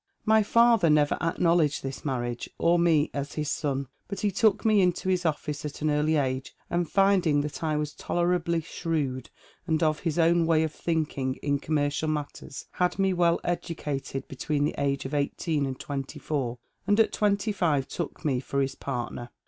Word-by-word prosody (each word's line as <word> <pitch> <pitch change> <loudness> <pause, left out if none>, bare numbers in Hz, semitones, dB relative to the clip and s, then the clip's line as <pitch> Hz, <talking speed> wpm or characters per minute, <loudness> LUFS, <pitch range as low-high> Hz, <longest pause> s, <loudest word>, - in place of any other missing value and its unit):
" - - -44
My 220 - +6
father 230 -3 +4
never 150 -1 +4
acknowledged 165 -2 +2
this 135 0 -5
marriage, 120 -4 -3
orme 170 -3 +3
as 140 0 -4
his 150 -2 -2
son 140 -3 -2 0.2
But 195 0 -5
he 205 - +1
took 210 +2 +2
me 215 -2 +5
into 180 +1 +1
his 180 -2 +1
office 150 -1 -3
at 150 0 -6
an 155 - +2
early 150 +2 +2
age, 130 -2 -1 0.2
and 175 -2 0
finding 190 -7 +3
that 150 +2 -5
I 155 -1 0
was 150 -1 -2
tolerably 175 -1 0
shrewd, 150 -6 -3 0.4
and 160 -1 +1
of 155 -1 +2
his 165 -3 -2
own 170 0 +4
way 160 -1 +3
of 155 -1 -2
thinking 150 -6 -1
in 140 -1 +1
com 155 +2 -2
mercial 145 +1 0
matters, 150 -3 -5
had 180 0 0
me 195 -1 +2
well 170 -1 +3
educated 150 -6 -3
between 145 +2 -2
the 150 - -1
age 140 -1 0
of 135 - -5
eighteen 145 +1 0
and 130 -1 -5
twenty 135 -2 -5
four, 130 -6 -2 0.3
and 205 +2 +3
at 225 - +4
twenty 205 +1 +1
five 155 -9 +1
took 170 -2 -5
me 135 -4 +1
for 140 +2 -3
his 135 0 0
partner. 120 -3 -5
155 Hz, 190 wpm, -27 LUFS, 140-175 Hz, 0.4 s, My